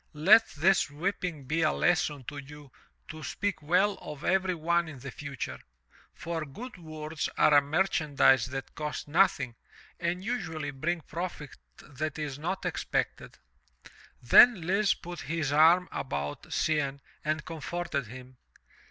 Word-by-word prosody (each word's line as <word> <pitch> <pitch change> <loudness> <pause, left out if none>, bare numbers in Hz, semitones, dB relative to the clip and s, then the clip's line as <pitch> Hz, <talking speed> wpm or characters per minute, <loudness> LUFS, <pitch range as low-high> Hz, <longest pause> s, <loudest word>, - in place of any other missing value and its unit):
Let 215 +9 +7
this 185 +2 +3
whipping 170 0 -3
be 155 +5 0
a 155 - +3
lesson 155 -5 +1
to 145 +4 -7
you 145 0 -12 0.4
to 155 0 -8
speak 195 +2 -3
well 180 +7 +2
of 150 0 -8
every 190 -1 +1
one 170 +1 +1
in 155 -3 -9
the 130 +1 -8
future, 140 - -6 0.6
for 165 -1 -4
good 205 - -9
words 155 -1 -5
are 150 - +5
a 145 - +8
merchandise 145 -5 +2
that 135 +1 -6
cost 150 -3 -5
noth 175 +4 +4
ing 125 -4 -5 0.4
and 175 +2 -2
usually 165 -11 -3
bring 165 +5 -2
profit 165 -3 -6 0.3
that 150 +2 -5
is 145 -2 -4
not 180 +5 -3
expected/* - - -2 0.8
Then 180 - +7
Lise 195 +3 +2
put 175 0 -9
his 155 -1 -2
arm 165 +4 +5
about 75 - -4
Cianne 140 -3 0 0.2
and 155 -1 -1
comforted 165 -3 -4
him. 130 +2 -11
155 Hz, 145 wpm, -29 LUFS, 145-175 Hz, 0.8 s, a